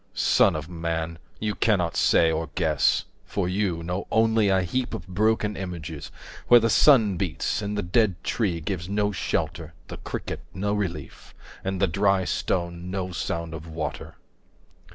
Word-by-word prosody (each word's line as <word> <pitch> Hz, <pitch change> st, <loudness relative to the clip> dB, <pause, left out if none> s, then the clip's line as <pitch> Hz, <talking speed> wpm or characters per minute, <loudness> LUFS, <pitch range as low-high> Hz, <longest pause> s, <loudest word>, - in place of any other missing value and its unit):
Son -, -, +4 dB
of 75 Hz, -1 st, -4 dB
man, 85 Hz, -1 st, -3 dB, 0.2 s
20 -, -, -5 dB
You 105 Hz, -, 0 dB
cannot 95 Hz, -8 st, +1 dB
say, 80 Hz, -1 st, +4 dB
or 80 Hz, -1 st, -2 dB
guess, 80 Hz, -4 st, +2 dB, 0.2 s
for 90 Hz, +8 st, -2 dB
you 90 Hz, -3 st, -1 dB
know 90 Hz, +3 st, -3 dB
only 110 Hz, -2 st, +3 dB
A 95 Hz, -1 st, +3 dB
heap 120 Hz, +6 st, -2 dB
of 110 Hz, -, -8 dB
broken 105 Hz, +2 st, +1 dB
images, 85 Hz, -5 st, -6 dB, 0.4 s
where 120 Hz, -, +8 dB
the 115 Hz, 0 st, +1 dB
sun 110 Hz, -, +5 dB
beats, 90 Hz, +2 st, -1 dB
And 105 Hz, 0 st, -3 dB
the 105 Hz, -, -1 dB
dead 100 Hz, +1 st, +2 dB
tree 90 Hz, -8 st, -1 dB
gives 90 Hz, +1 st, -4 dB
no 105 Hz, 0 st, +1 dB
shelter, 80 Hz, -3 st, -3 dB
the -, -, -6 dB
cricket -, -, -5 dB, 0.2 s
no 100 Hz, +2 st, -1 dB
relief, 90 Hz, -8 st, -5 dB, 0.3 s
And 95 Hz, -1 st, -2 dB
the 95 Hz, -, +4 dB
dry 95 Hz, +2 st, +2 dB
stone 85 Hz, 0 st, -2 dB
no 95 Hz, -1 st, -3 dB
sound 85 Hz, -1 st, -3 dB
of 80 Hz, 0 st, -8 dB
water. 80 Hz, -1 st, -5 dB
90 Hz, 165 wpm, -25 LUFS, 85-105 Hz, 0.4 s, where